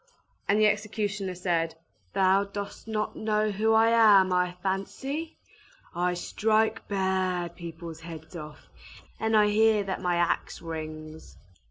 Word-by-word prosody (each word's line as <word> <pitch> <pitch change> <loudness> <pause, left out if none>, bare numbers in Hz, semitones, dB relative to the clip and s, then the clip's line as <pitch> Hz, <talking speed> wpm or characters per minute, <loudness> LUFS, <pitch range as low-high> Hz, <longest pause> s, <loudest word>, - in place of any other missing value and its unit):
And 205 +2 +3
the 215 - +5
executioner 205 -2 -1
said, 170 -2 -1 0.4
"Thou 195 +1 +3
dost 200 +2 -7
not 215 -1 -2
know 215 0 0
who 220 +2 +2
I 225 +1 +5
am, 205 -5 +6
I 180 0 0
fancy? 270 +12 -3 0.6
I 180 +1 0
strike 220 +4 0
bad 185 -3 -1
people's 165 -1 -8
heads 165 0 -10
off; 150 -2 -9 0.5
and 220 0 +2
I 210 -1 +5
hear 215 0 +4
that 195 -1 -4
my 180 -1 +1
axe 170 0 0
rings!" 155 -1 -8
195 Hz, 135 wpm, -27 LUFS, 175-215 Hz, 0.6 s, am